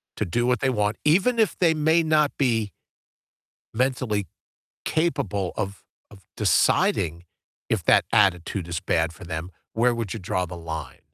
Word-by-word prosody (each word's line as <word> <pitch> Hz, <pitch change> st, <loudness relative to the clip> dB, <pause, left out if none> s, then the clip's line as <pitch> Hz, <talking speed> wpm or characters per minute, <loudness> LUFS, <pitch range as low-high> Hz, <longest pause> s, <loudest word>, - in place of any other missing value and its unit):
to -, -, -2 dB
do 120 Hz, +8 st, 0 dB
what 125 Hz, -2 st, +2 dB
they 135 Hz, -, +1 dB
want," 105 Hz, -3 st, 0 dB
even 200 Hz, +10 st, +3 dB
if 215 Hz, -, +2 dB
they 165 Hz, -3 st, +3 dB
may 160 Hz, +2 st, +3 dB
not 155 Hz, -2 st, +3 dB
be 115 Hz, -, 0 dB, 1.0 s
mentally 120 Hz, -5 st, 0 dB, 0.6 s
capable 105 Hz, -, -1 dB
of, 100 Hz, -1 st, -4 dB, 0.3 s
of 100 Hz, -2 st, -16 dB
deciding 85 Hz, +2 st, +2 dB, 0.5 s
if -, -, +1 dB
that -, -, +5 dB
attitude 90 Hz, -1 st, +2 dB
is 85 Hz, -1 st, -3 dB
bad 80 Hz, 0 st, 0 dB
for 95 Hz, -, -12 dB
them? 85 Hz, +1 st, -5 dB, 0.2 s
Where 120 Hz, +2 st, +2 dB
would 115 Hz, -5 st, -4 dB
you 110 Hz, -, -5 dB
draw 90 Hz, 0 st, -1 dB
the 90 Hz, 0 st, -8 dB
line? 80 Hz, -5 st, -7 dB
105 Hz, 155 wpm, -24 LUFS, 90-135 Hz, 1.0 s, that